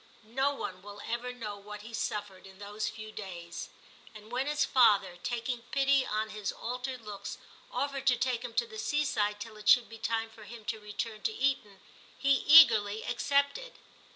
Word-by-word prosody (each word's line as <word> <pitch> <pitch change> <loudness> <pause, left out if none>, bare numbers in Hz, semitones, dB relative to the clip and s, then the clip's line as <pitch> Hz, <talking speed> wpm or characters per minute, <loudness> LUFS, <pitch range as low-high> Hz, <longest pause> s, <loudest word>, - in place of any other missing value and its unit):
No 270 +2 +2
one 185 -8 -5
will 205 +1 -10
ever 240 +2 -2
know 215 -5 -6
what 210 +1 -9
he 230 +2 -10
suffered 205 -4 -4
in 190 0 -15
those 210 +1 -4
few 215 0 -9
days; 170 -5 -7 0.5
and 215 +1 -12
when 255 +3 -1
his 295 0 +2
father, 205 -8 +4
taking 240 0 -2
pity 275 -1 +3
on 215 +1 -1
his 210 -2 -3
altered 250 +1 -5
looks, 205 -2 -7 0.3
offered 275 -1 -2
to 250 - +6
take 250 -1 0
him 240 -2 -7
to - - +2
the 445 -1 -9
seaside 285 - 0
till 215 0 -8
it 210 0 -1
should 245 - +7
be 225 0 -10
time 225 0 -1
for 225 -1 -13
him 225 0 -11
to 220 - -3
return 215 +1 -5
to - - 0
Eton, 240 - 0 0.4
he 275 - +2
eagerly 230 -8 +7
accepted. 280 - 0
225 Hz, 180 wpm, -31 LUFS, 210-265 Hz, 0.5 s, should